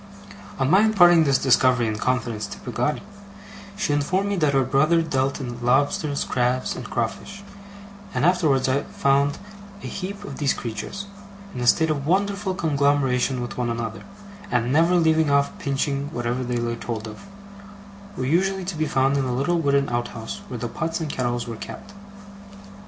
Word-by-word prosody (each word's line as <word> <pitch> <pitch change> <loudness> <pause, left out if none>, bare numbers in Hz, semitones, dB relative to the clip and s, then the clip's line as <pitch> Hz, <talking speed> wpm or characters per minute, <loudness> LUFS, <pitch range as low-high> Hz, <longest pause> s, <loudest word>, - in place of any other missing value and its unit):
On 135 - +1
my 185 +7 +5
imparting 175 -7 +6
this 140 -2 +3
discovery 130 -2 +3
in 110 -1 -2
confidence 120 -4 -1
to - - -8
Peggotty, 125 +4 -2 0.7
she 190 -8 0
informed 185 +8 0
me 200 - 0
that 150 -4 +2
her 135 -1 +3
brother 155 +6 +3
dealt 135 -3 -1
in 120 -3 -6
lobsters, 140 +3 +1
crabs, 125 +1 0
and - - -7
crawfish; 200 0 -4 0.7
and 125 +4 0
I - - +7
afterwards 155 -8 +2 0.3
found 140 +1 +2
that - - -11 0.4
a - - -7
heap 200 +1 -5
of - - -8
these 140 -3 +1
creatures, 120 - -5 0.5
in 125 - -5
a 120 - -1
state 160 +5 +4
of 140 -2 -3
wonderful 200 +1 0
conglomeration 140 -5 +1
with 120 +1 -6
one 120 -1 0
another, 115 -1 -4 0.5
and 120 +1 0
never 165 +4 +4
leaving 160 -2 +3
off 140 0 +2
pinching 140 0 -1
whatever 120 -1 -2
they 120 0 -2
laid 120 0 -3
hold 110 -2 -4
of, 110 - -11 0.9
were 130 - -2
usually 190 +6 +1
to 180 -1 -4
be 155 0 -1
found 135 +1 +2
in 135 - 0
a 125 -1 -1
little 170 +7 +1
wooden 140 -2 +2
outhouse 120 -2 -4
where 125 - -6
the 120 - -3
pots 165 +8 -3
and 155 -3 -3
kettles 120 -2 -2
were 115 -1 -6
kept. 205 - -9
140 Hz, 175 wpm, -23 LUFS, 125-165 Hz, 0.9 s, I